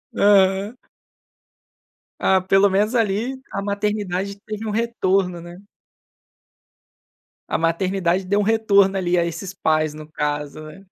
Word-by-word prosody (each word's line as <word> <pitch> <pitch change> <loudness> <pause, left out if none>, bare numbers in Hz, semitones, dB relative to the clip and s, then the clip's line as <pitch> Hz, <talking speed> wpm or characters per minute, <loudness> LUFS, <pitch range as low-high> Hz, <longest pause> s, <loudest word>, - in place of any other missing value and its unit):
Aham. 200 +2 +3 1.4
Ah, 190 -1 +3
pelo 195 +2 +4
menos 205 +5 +1
ali 230 +4 0
a - - -3
maternidade 200 -1 -2
teve 215 +1 -7
um 215 - -2
retorno, 195 -6 0
né. 175 +1 -11 1.9
A - - 0
maternidade 180 +2 0
deu 200 +2 +1
um - - +1
retorno 200 -3 +3
ali 180 -1 0
a 170 - +2
esses 170 +3 -6
pais 155 -3 0
no 155 0 -10
caso, 150 -1 -3
né? 185 +6 -12
195 Hz, 125 wpm, -21 LUFS, 175-205 Hz, 1.9 s, pelo